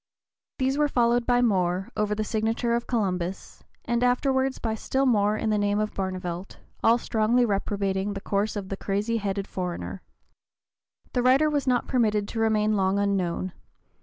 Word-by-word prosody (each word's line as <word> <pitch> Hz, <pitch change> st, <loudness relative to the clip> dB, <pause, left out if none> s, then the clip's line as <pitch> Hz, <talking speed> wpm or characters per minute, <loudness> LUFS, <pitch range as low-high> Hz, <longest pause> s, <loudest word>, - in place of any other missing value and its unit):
These 265 Hz, +2 st, 0 dB
were 295 Hz, -, +4 dB
followed 240 Hz, -2 st, +2 dB
by 245 Hz, 0 st, +3 dB
more, 185 Hz, -4 st, +1 dB
over 210 Hz, 0 st, 0 dB
the 215 Hz, -, -1 dB
signature 225 Hz, +2 st, 0 dB
of 235 Hz, 0 st, -1 dB
Columbus, 190 Hz, -6 st, -2 dB, 0.2 s
and 235 Hz, +1 st, 0 dB
afterward 265 Hz, +1 st, +1 dB
by 225 Hz, -2 st, -1 dB
still 265 Hz, +5 st, -1 dB
more 210 Hz, -4 st, +3 dB
in 220 Hz, -, -1 dB
the 210 Hz, -, +2 dB
name 205 Hz, 0 st, +1 dB
of 215 Hz, 0 st, -1 dB
Barnevelt, 185 Hz, -1 st, -4 dB, 0.3 s
all 230 Hz, +1 st, +5 dB
strongly 235 Hz, +1 st, +2 dB
reprobating 200 Hz, -1 st, -1 dB
the 195 Hz, -, -4 dB
course 200 Hz, +2 st, -1 dB
of 195 Hz, -2 st, -5 dB
the 195 Hz, -, -3 dB
crazy 210 Hz, +4 st, -1 dB
headed 200 Hz, -2 st, -2 dB
foreigner. 170 Hz, -, -5 dB, 1.1 s
The 250 Hz, -, +1 dB
writer 270 Hz, +5 st, +4 dB
was 285 Hz, -2 st, -1 dB
not 250 Hz, -1 st, +2 dB
permitted 215 Hz, -5 st, +1 dB
to 225 Hz, -, -4 dB
remain 215 Hz, -1 st, +2 dB
long 190 Hz, 0 st, +1 dB
unknown. 185 Hz, -2 st, -1 dB
215 Hz, 165 wpm, -26 LUFS, 195-240 Hz, 1.1 s, all